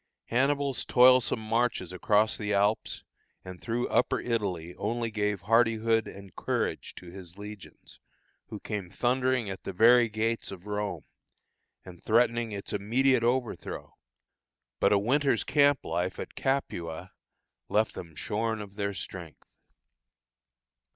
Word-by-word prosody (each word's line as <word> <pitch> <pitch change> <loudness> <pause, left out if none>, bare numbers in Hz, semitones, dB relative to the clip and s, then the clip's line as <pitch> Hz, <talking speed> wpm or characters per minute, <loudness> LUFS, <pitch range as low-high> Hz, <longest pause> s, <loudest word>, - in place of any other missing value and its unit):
Hannibal's 140 +2 +1
toilsome 125 -1 +5
marches 115 -5 -1
across 105 +4 +2
the 105 -1 -2
Alps 105 +2 0 0.4
and 95 -1 -9
through 120 +1 -1
Upper 125 - +2
Italy 95 -8 -2
only 115 +3 -2
gave 105 -2 -1
hardihood 115 +1 +2
and 100 -1 -11
courage - - -2
to 90 -1 -11
his 90 -1 -11
legions, 105 -1 -11 0.5
who 105 -1 -7
came 100 -5 -5
thundering 125 +3 0
at 95 -1 -6
the 95 - -6
very 120 +4 +6
gates 115 +2 -1
of 95 -1 -10
Rome, 105 -1 -3 0.8
and 90 -2 -12
threatening 115 0 +2
its 100 -1 -5
immediate 120 +5 +2
overthrow; 120 0 -2 0.9
but - - +3
a 105 - +5
winter's 130 +3 +2
camp 145 -2 +3
life 90 +3 -2
at - - -6
Capua 90 - -3 0.6
left 105 0 +2
them 85 -3 -9
shorn 110 +6 -2
of 100 -1 -9
their 100 -1 -2
strength. 85 -4 -8
110 Hz, 130 wpm, -28 LUFS, 100-120 Hz, 0.9 s, very